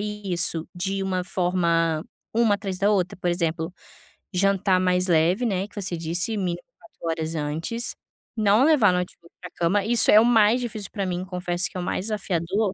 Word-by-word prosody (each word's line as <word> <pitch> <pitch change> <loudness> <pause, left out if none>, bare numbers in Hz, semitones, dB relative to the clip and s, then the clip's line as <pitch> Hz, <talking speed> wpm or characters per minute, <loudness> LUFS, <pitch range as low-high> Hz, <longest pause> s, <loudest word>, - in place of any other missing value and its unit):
isso 190 -6 -2
de 195 +2 -2
uma 185 -1 -1
forma, 170 -3 0 0.3
uma 230 -3 +3
atrás 195 -3 -5
da 205 +1 +2
outra, 185 -3 0
por 175 -1 0
exemplo, 165 -1 -2 0.6
jantar 190 0 +2
mais 180 0 +1
leve, 175 +7 +2
né, 195 -2 -1
que 205 - -23
você 185 -3 -3
disse, 170 +7 -1
mínimo 175 -3 -2 0.2
4 225 - -21 0.2
horas 160 +1 -3
antes, 160 +10 -2 0.4
não 215 +3 +4
levar 270 - +5
notebook 180 -1 -4
para 180 - -8
a - - -40
cama, 190 +4 +1
isso 235 +1 +5
é 210 - +8
o - - +5
mais 230 0 +4
difícil 215 -4 -5
para 200 -3 -3
mim, 180 0 -3
confesso 180 -1 -2
que - - -9
é - - -2
o - - -4
mais 185 - -2
desafiador. 195 -1 -1
185 Hz, 190 wpm, -24 LUFS, 175-210 Hz, 0.6 s, é